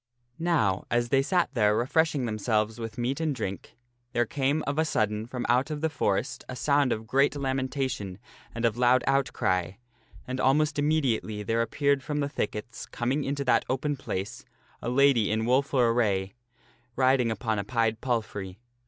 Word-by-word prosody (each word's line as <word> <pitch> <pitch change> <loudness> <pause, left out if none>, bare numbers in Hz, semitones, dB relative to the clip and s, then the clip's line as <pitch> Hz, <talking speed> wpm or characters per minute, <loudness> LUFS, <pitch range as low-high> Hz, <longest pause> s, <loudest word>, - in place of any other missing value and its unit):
Now 150 - +1
as 120 0 +1
they 135 +1 +4
sat 175 +5 +1
there 105 -2 +3
refreshing 145 +2 +1
themselves 110 0 -1
with 115 -1 -6
meat 125 +4 -1
and 155 -3 0
drink, 95 -6 -6 0.4
there 120 -1 +2
came 140 +5 0
of 140 +2 -1
a - - +4
sudden 110 -7 -1
from 125 0 -4
out 125 +5 +2
of 150 -1 -4
the 160 0 0
forest 125 -1 -1
a 130 - -5
sound 140 0 +2
of 110 0 -2
great 135 +5 +2
lamentation 130 -7 -2 0.4
and 115 0 -1
of 115 0 +1
loud 125 +1 +4
outcry, 95 -10 0 0.5
and 130 +1 -3
almost 145 +3 +2
immediately 130 -8 0
there 115 +3 0
appeared 140 +3 +1
from 150 +2 -3
the 140 -1 -1
thickets, 105 -3 -4
coming 130 +5 -1
into 140 +1 -2
that 125 - +3
open 145 +3 0
place, 100 -7 -5 0.4
a - - -3
lady 130 -4 +4
in 110 +1 0
woful 135 +3 +2
sorrowful 115 -2 +4
lady 110 -3 +3 0.2
array, - - -31 0.6
riding 130 -2 +3
upon 110 -1 -1
a - - -2
pied 115 0 0
palfrey. 105 -6 -3
125 Hz, 175 wpm, -27 LUFS, 110-140 Hz, 0.6 s, they